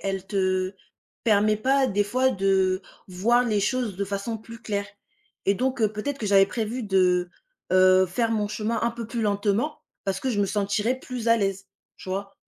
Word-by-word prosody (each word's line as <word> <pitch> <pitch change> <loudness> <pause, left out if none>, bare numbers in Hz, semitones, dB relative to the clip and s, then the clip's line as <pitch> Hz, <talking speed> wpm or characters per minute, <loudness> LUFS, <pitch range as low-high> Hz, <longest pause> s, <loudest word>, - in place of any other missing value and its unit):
elle 195 -1 -3
te 185 -1 0 0.5
permet 215 -1 +3
pas 265 +4 +2
des 205 -1 +1
fois 255 +5 +2
de 190 -2 +1 0.3
voir 235 +7 +2
les 210 -4 +1
choses 230 -3 -1
de 200 - -1
façon 200 +3 -3
plus 230 +1 -12
claire 200 -3 -3 0.6
et 195 - +4
donc 255 +4 -1
heu, 215 -2 +3
peut-être 270 +7 -4
que 220 - -3
j'avais 195 -1 +5
prévu 230 +3 -3
de, 180 -3 +2 0.4
heu, 185 0 +6
faire 225 +6 -1
mon 210 -2 0
chemin 215 +2 -2
un 235 - +2
peu 230 -1 -7
plus 230 0 -3
lentement 205 +7 0 0.2
parce 190 -1 -2
que 265 - -1
je 205 -4 0
me 200 - +2
sentirais 210 +5 0
plus 245 -3 -4
à 230 - +6
l'aise, 195 -2 -2 0.3
tu - - -11
vois? 195 +1 -4
205 Hz, 190 wpm, -25 LUFS, 195-230 Hz, 0.6 s, heu